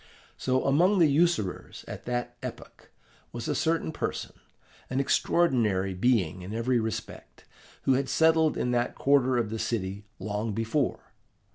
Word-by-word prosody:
So, 130 0 0
among 175 +9 +4
the 170 - +6
usurers, 150 - 0
at - - -8
that 120 0 -3
epoch, - - -9 0.4
was 120 -1 -5
a - - 0
certain 160 0 0
person - - -4 0.6
an 130 - -1
extraordinary 115 - +2
being 95 -4 +1
in 95 +4 -6
every 120 +2 +1
respect, 110 0 -6 0.4
who 135 - +3
had 135 +1 0
settled 160 -1 +3
in 125 - 0
that 120 0 0
quarter 135 -2 +3
of 115 -3 -1
the 110 - -3
city 105 -3 -3
long 105 +1 -3
before. 115 +6 -2
120 Hz, 145 wpm, -28 LUFS, 110-140 Hz, 0.6 s, the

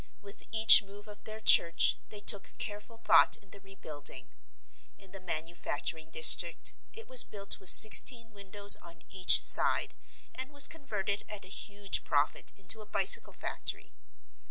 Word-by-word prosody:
With 200 -1 -15
each 220 0 +6
move 200 +1 -18
of 205 0 -16
their 215 0 -9
church 170 -5 +1
they 210 -1 -7
took 200 -1 -1
careful 210 +2 -9
thought - - +1
in 195 -3 -26
the 200 - -15
rebuilding. 175 -7 -8 0.7
In 195 -2 -17
the 195 - -12
manufacturing 160 -2 -7
district 160 +2 +3 0.2
it 455 - -14
was 255 -2 +4
built 200 -1 -8
with 190 - -1
sixteen 225 +1 +6
windows 200 0 0
on 170 -1 -19
each 185 -1 +2
side - - +1 0.4
and 260 +1 -9
was 285 0 +1
converted 210 - -7
at 210 -2 -10
a - - -15
huge 200 0 -7
profit 145 +1 -4
into 200 +3 -6
a 210 - -17
bicycle 200 -2 +1
factory. - - -8
200 Hz, 155 wpm, -27 LUFS, 185-215 Hz, 0.7 s, each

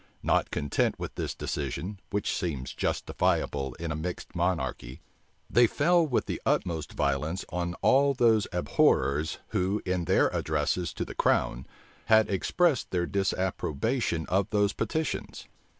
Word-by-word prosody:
Not - - +2
content 75 - 0
with - - -6
this - - -4
decision, 90 +8 -4
which 100 0 -1
seems 75 -9 -3
justifiable 70 -3 -1
in 85 -1 -4
a - - -2
mixed 85 +3 -5
monarchy, 80 -8 -2 0.5
they 120 +1 +5
fell 170 +6 +3
with 130 - 0
the - - -4
utmost 80 -3 -1
violence 75 +6 -1
on 85 0 -3
all 140 +1 +4
those 115 -4 +3
abhorrers, 75 -4 +2
who 95 +3 0
in 90 -2 -1
their 95 - +3
addresses 80 +3 0
to - - -2
the - - -8
crown, 65 +2 +1 0.4
had 110 -1 +4
expressed 145 - +1
their 90 -1 0
disapprobation 95 - -1
of 95 +1 0
those 105 -1 +2
petitions. 160 -1 -3
90 Hz, 135 wpm, -28 LUFS, 75-105 Hz, 0.5 s, they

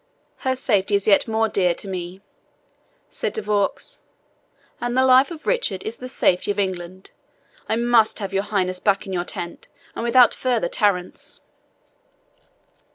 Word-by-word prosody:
"Her 260 -1 -1
safety 205 -6 +1
is 200 - 0
yet 205 +1 +4
more 225 0 +1
dear 180 -5 +1
to 200 - -10
me," 185 0 -6 0.9
said - - -3
De 440 - -3
Vaux, 205 -1 -1 0.8
"and 240 +1 -2
the 260 - +5
life 260 +1 +6
of 325 -3 -9
Richard 250 - 0
is 220 +1 -5
the 255 - -7
safety 185 -7 +1
of 205 - 0
England. 185 -1 -4 0.6
I - - +2
must 235 -1 +3
have 195 -2 -4
your 195 - +2
Highness 185 -3 0
back 200 0 +2
to 195 - -8
your 175 -1 -2
tent, 170 -1 -6 0.3
and - - -4
that - - -1
without 245 0 +6
further 245 -7 0
tarriance." 185 -3 -1
205 Hz, 160 wpm, -22 LUFS, 185-240 Hz, 0.9 s, life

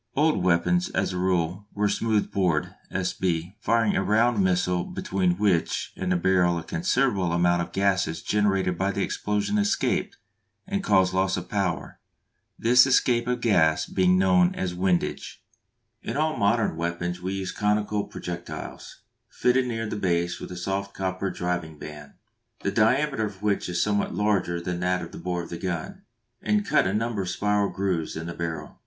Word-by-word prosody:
Old 155 +2 +2
weapons 95 - +2
as - - -1
a - - -3
rule 90 +1 0
were 105 0 +2
smooth 110 0 0
bored 90 -6 0 0.2
(S. 90 -1 -2
B.), 90 +1 -2
firing 115 -1 +2
a - - +2
round 110 +2 +2
missile 90 -1 +1
between 90 -2 -1
which 95 -5 0
and 95 -1 -2
the - - +3
barrel 90 -1 +2
a 85 - -4
considerable 95 +1 0
amount 85 0 +2
of 85 - -3
the - - -23
gases 95 -5 +1
generated 95 -4 +1
by 95 +1 +1
the 100 0 -1
explosion 105 - -1
escaped 205 +1 0 0.5
and 200 0 -2
caused 95 - +3
loss 95 0 +1
of 90 0 -6
power, 95 -4 -2 0.6
this 125 +3 +5
escape 120 -2 +2
of 125 -1 -1
gas 90 -8 +3
being 90 -1 +2
known 90 -1 +4
as 90 -1 -2
windage. 90 -1 -1 0.6
In - - -4
all 155 +1 +1
modern 105 -4 +1
weapons 85 +1 -3
we 95 +1 -3
use 95 -1 -3
conical 105 0 0
projectiles, 85 0 -7 0.3
fitted 125 +1 +2
near 115 -2 -2
the 105 - -4
base 85 -2 0
with - - -8
a 90 - -6
soft 100 +2 -3
copper 95 0 -2
driving 90 -4 -3
band, 75 -1 -10 0.5
the - - -1
diameter 130 +2 +2
of 100 -1 -12
which 100 -3 0
is 85 0 +1
somewhat 105 0 0
larger 100 -4 +1
than 85 0 -3
that 90 0 0
of - - -8
the - - -9
bore 90 -1 -3
of 85 - -10
the 85 - -6
gun, 95 - -4 0.4
and 210 -1 +1
cut - - +3
a - - 0
number 110 -1 -1
of 90 - -3
spiral 105 0 +1
grooves 90 -5 -2
in 80 - -5
the 85 - -5
barrel. 85 -1 -5
95 Hz, 180 wpm, -25 LUFS, 90-105 Hz, 0.6 s, this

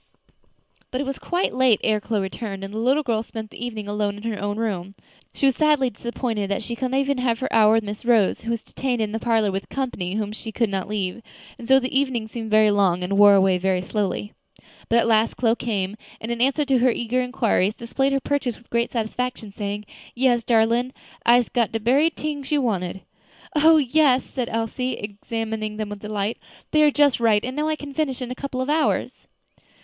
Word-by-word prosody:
But 255 - -3
it - - 0
was 275 -1 -4
quite 355 +1 -1
late 255 -4 +3
ere 215 -1 +1
Chloe 215 -1 -1
returned, 195 0 -5
and 195 +1 -7
the 220 - -3
little 265 +6 +2
girl 230 -5 0
spent 220 -1 -8
the - - -8
evening 220 -4 -5
alone 205 0 -1
in 205 - -11
her 225 -3 -3
own 205 0 -2
room. 200 -4 -3 0.4
She - - -1
was 270 -2 +4
sadly 295 -4 +3
disappointed 225 -2 -3
that 200 +2 -1
she 235 - -4
could 255 +2 -2
not 265 +1 +1
even 275 -1 0
have 240 -2 +1
her 260 - -4
hour 215 -1 +6
with 225 0 +3
Miss 205 0 -6
Rose, 230 -5 +3
who 230 - -6
was 230 -1 -2
detained 255 -3 -3
in 215 -2 -1
the 225 - -2
parlor 225 -3 +1
with 195 +1 -4
company 205 -9 -3
whom 210 -1 -2
she 220 +1 -7
could 225 -1 0
not 190 -1 -2
leave, 205 +1 -3 0.4
and 230 - -8
so 265 +1 +6
the 260 0 -4
evening 260 -5 0
seemed 225 0 -6
very 215 0 +5
long 190 -3 +2
and 190 +2 -1
wore 205 -1 +8
away 190 -2 +3
very 185 0 0
slowly. 205 +1 -2 0.6
But 230 - +4
at 235 - +3
last 225 0 +3
Chloe 230 -2 +2
came, 205 -5 -2 0.2
and 225 - -5
in 235 0 -2
answer 275 +3 +2
to 270 -2 +2
her 255 +1 +4
eager 240 +1 0
inquiries 230 -5 +1
displayed 270 +4 -1
her 275 - +2
purchases 270 -4 -1
with 235 - -23
great 235 0 +1
satisfaction, 230 -1 -3
saying, 205 0 -4 0.3
"Yes, 240 -2 +2
darlin', 235 +2 +2 0.3
I'se 240 0 +5
got 235 -4 0
de 225 - 0
berry 265 +9 +3
t'ings 295 -3 -5
you 295 - +3
wanted." 190 -5 -2 0.5
"Oh! 315 +2 +6
yes," 275 -2 +3
said 250 -3 -4
Elsie, 230 +3 -2
examining 215 +1 -4
them 215 -1 -3
with 205 -1 -7
delight; 210 +1 -3 0.3
"they 305 - +4
are 300 - +6
just 290 -3 +3
right; 220 -2 +3
and 255 +1 -5
now 300 +1 0
I 310 - +1
can 290 -2 -9
finish 275 -4 -1
it - - -3
in 245 - -8
a - - -4
couple 260 -1 -4
of 260 - -3
hours." 310 0 0
230 Hz, 225 wpm, -23 LUFS, 210-260 Hz, 0.6 s, wore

